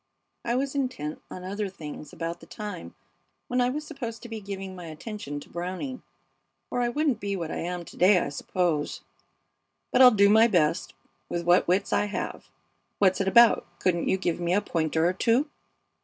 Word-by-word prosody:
I 235 - 0
was 270 +1 -1
intent 250 - -3
on 180 - -8
other 200 +2 -3
things 150 -5 -9
about 165 0 -4
the - - -15
time 205 -5 -7 0.5
when 250 0 +1
I 245 - +3
was 300 +4 -4
supposed 245 -7 -6
to 240 - -8
be 225 -1 -6
giving 195 -1 -6
my 180 -2 -8
attention 155 -2 -6
to - - -14
Browning, 185 +10 -5 0.7
or 245 - 0
I 240 - +1
wouldn't 280 -2 0
be 200 0 -2
what 165 -4 -4
I - - -3
am 175 0 -4
to - - -13
day, 185 +2 +6
I 170 - 0
suppose. 155 +1 -1 0.9
But 255 - +4
I'll 255 - +11
do 200 -4 +5
my 220 +3 +6
best 170 -7 +1 0.3
with 170 -1 -3
what 175 +1 +4
wits 185 +3 +1
I - - +3
have. 205 - -5 0.5
What's 190 -1 +3
it 195 - -1
about? 235 +4 +6
Couldn't 175 -2 +1
you 190 - +3
give 175 -3 -1
me 175 +1 +1
a 205 - +3
pointer 160 -4 0
or 180 - +1
two?" 235 - +2
195 Hz, 195 wpm, -27 LUFS, 175-235 Hz, 0.9 s, I'll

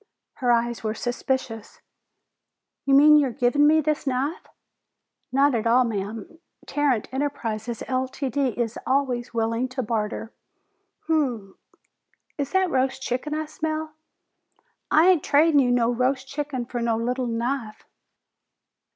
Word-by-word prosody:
Her 245 -2 +1
eyes 235 0 0
were 215 0 -2
suspicious. 245 -2 -3 1.1
"You 275 - +4
mean 300 +2 +8
you're 285 -3 +3
givin' 250 +5 +2
me 315 +1 +5
this 305 -1 -1
knife?" 270 +5 -2 0.8
"Not 275 +1 +3
at 230 -1 0
all, 245 +2 +5
ma'am. 220 - -5 0.3
Tarrant 280 -7 0
Enterprises, 240 -5 -3
Ltd., 260 0 -2
is 235 -2 -2
always 255 -3 0
willing 230 +2 0
to 255 0 -3
barter. 220 0 -3 0.7
Umm! 250 -12 -1 0.8
Is 280 -1 -1
that 380 -2 +2
roast 265 0 0
chicken 265 +5 -2
I 310 0 -2
smell?" 310 0 -4 1.0
"I 320 +3 +5
ain't 360 -6 +4
tradin' 295 +1 +4
you 255 -3 +3
no 245 -1 +2
roast 260 +2 0
chicken 280 -3 -4
for 240 0 -4
no 230 -1 +1
little 250 +2 -1
knife!" 230 -1 -3
255 Hz, 130 wpm, -24 LUFS, 235-285 Hz, 1.1 s, mean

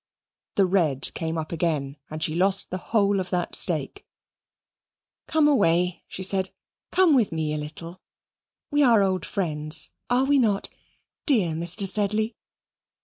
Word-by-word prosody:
The 195 - +4
red 165 -8 +1
came 160 0 -3
up 160 -1 -4
again, 155 -5 -1
and 155 0 -4
she 155 - 0
lost 190 +3 +1
the 185 - -3
whole 200 -3 +2
of 185 - -4
that 180 -1 -2
stake. - - +1 1.2
"Come 315 -2 +3
away," 180 - +2
she 190 - -6
said. 190 0 0 0.4
"Come 370 -4 +4
with 240 -7 +3
me 160 -2 -2
a - - -2
little 165 +4 -9 0.7
we 290 0 +2
are 230 -7 +5
old 185 -4 -1
friends, 155 -4 -1 0.2
are 245 +2 +3
we 280 +1 +3
not, 210 -5 +1 0.6
dear 215 - +3
Mr. 170 +5 0
Sedley?" 215 +3 -1
185 Hz, 145 wpm, -25 LUFS, 165-215 Hz, 1.2 s, are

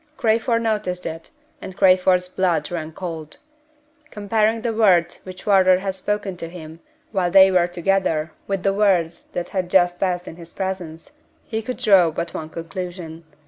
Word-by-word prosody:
Crayford 230 +1 +1
noticed 195 -5 -2
it, 165 0 -6 0.3
and 190 - -9
Crayford's 185 -1 +4
blood 180 -5 -1
ran 160 -2 -4
cold. 160 -3 -7 0.7
Comparing 215 +2 0
the 235 -2 -1
words 180 -6 +3
which 185 -1 -10
Wardour 190 -2 +5
had 190 +1 -3
spoken 200 0 -3
to 165 - -7
him 160 -2 -10 0.3
while 185 -4 0
they 190 +1 +7
were 185 - +4
alone - - -7
together 175 -4 0 0.2
with 195 -2 -2
the 195 - +2
words 180 -5 +1
that 175 - -4
had 185 -2 -2
just 175 -1 +3
passed 180 -2 -1
in 160 - -9
his 170 -1 -13
presence, 185 - -5 0.3
he 220 -1 -4
could 250 +3 -5
draw 190 -5 +5
but 170 +2 -4
one 155 -1 -6
conclusion. 170 -1 -7
185 Hz, 170 wpm, -21 LUFS, 170-195 Hz, 0.7 s, they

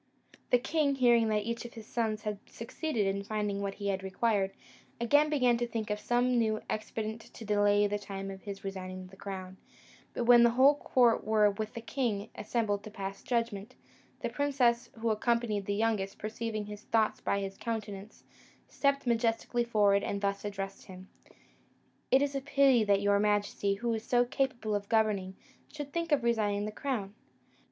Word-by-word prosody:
The 245 - +6
king, 280 +2 +1
hearing 240 -3 +4
that 210 -1 +1
each 235 0 -3
of 240 - -10
his 225 -2 -9
sons 220 -2 -2
had 210 -2 -3
succeeded 230 -1 -3
in 195 +1 -1
finding 205 -1 -2
what 200 -1 -3
he 200 -1 -3
had 190 -1 -1
required, 195 +1 0 0.5
again 290 +6 +4
began 250 -5 +3
to 240 0 -1
think 225 -2 -3
of 210 - -1
some 245 +2 +2
new 215 -1 +1
expedient 215 +1 -4
to 225 - -12
delay 205 0 +3
the 205 0 -1
time 195 -1 -6
of 190 0 -9
his 200 -2 -7
resigning 185 -1 -6
the 185 +1 -14
crown; 190 -1 -7 0.6
but - - -1
when 240 0 +7
the 235 - +7
whole 260 +4 +6
court 250 -5 +2
were 215 -1 +4
with 215 +3 -5
the 235 - -5
king 225 -4 -2
assembled 210 -2 -1
to 215 - -8
pass 195 -1 -6
judgment, 230 -1 -2 0.5
the - - -1
princess 260 -4 +1
who 230 -1 +2
accompanied 215 -2 0
the 200 - 0
youngest, 210 -3 0
perceiving 215 0 -4
his 210 0 -8
thoughts 220 -1 +1
by 200 - 0
his 195 -1 -4
countenance, 210 -2 -6 0.4
stepped 280 -1 0
majestically 235 0 +1
forward 205 -4 +3
and 200 - -2
thus 200 0 -1
addressed 195 -1 -5
him: 185 0 -12 1.0
"It 265 +2 +5
is 285 -1 -1
a 275 - -2
pity 270 -3 +4
that 200 -1 +3
your 200 0 +3
majesty, 205 -1 +1
who 235 +3 -1
is 220 -1 -3
so 245 0 +3
capable 245 -4 -1
of 205 -1 -2
governing, 210 -4 +1 0.4
should 290 -2 -7
think 335 -1 -2
of 285 -4 +3
resigning 210 -3 +1
the 215 - -4
crown! 215 -5 -3
215 Hz, 180 wpm, -31 LUFS, 200-240 Hz, 1.0 s, when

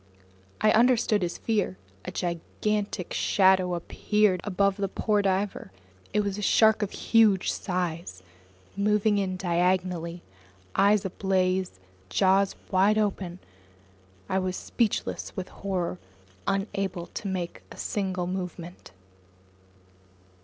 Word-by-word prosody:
I 215 - +5
understood 230 -3 +4
his 175 -1 -2
fear. 210 - -1 0.3
A - - -4
gigantic 185 +2 -2
shadow 185 -2 +3
appeared 195 +2 +1
above 200 0 +1
the 200 -1 0
poor 210 +2 +1
diver. 195 - -1 0.4
It 210 - +2
was 200 0 -3
a - - -4
shark 220 +1 +4
of 205 - 0
huge 215 -5 +3
size, 170 - -3 0.5
moving 210 +1 +2
in 185 -2 -1
diagonally, 175 -1 0 0.5
eyes 200 +1 +4
ablaze, 185 - 0 0.3
jaws 195 - +3 0.2
wide 195 +3 +4
open! 195 -4 -1 0.9
I 190 - +1
was 185 -1 -2
speechless 230 -4 -2
with 185 -1 -5
horror, 180 - -3 0.5
unable 195 -3 -1
to 200 - -6
make 180 -3 -4
a - - -11
single 190 -3 -2
movement. 180 -1 -6
190 Hz, 110 wpm, -27 LUFS, 180-205 Hz, 0.9 s, I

